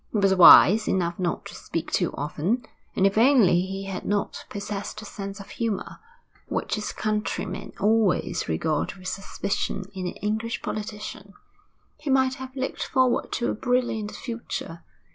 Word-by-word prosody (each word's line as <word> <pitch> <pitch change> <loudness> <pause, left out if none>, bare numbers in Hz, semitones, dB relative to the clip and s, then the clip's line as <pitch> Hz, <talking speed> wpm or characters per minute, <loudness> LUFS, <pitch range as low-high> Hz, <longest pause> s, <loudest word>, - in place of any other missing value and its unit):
He - - -1
was 195 -1 +4
wise 190 +3 +8
enough 175 -2 0
not 175 -2 -2
to - - -9
speak - - -5
too - - +1
often, 165 - -1 0.3
and 190 - +3
if 195 +2 +3
only 230 -9 +5
he 195 +1 -4
had 195 -1 -5
not 205 0 -2
possessed 205 0 -5
a - - -9
sense 200 0 -7
of 200 - -11
humour 225 -5 -3 0.5
which - - -2
his 210 -1 -2
countrymen 215 0 -3
always 215 -1 +2
regard 145 - -1
with 185 -1 -9
suspicion 195 0 -3
in 185 -2 -4
an - - -4
English 220 +3 -3
politician 210 -1 -6 0.6
he 300 -1 -5
might 260 -1 +3
have 260 0 -8
looked 265 0 -3
forward 255 -2 +1
to 240 - 0
a - - -1
brilliant 240 -3 0
future. 230 -8 -6
205 Hz, 160 wpm, -25 LUFS, 190-230 Hz, 0.6 s, wise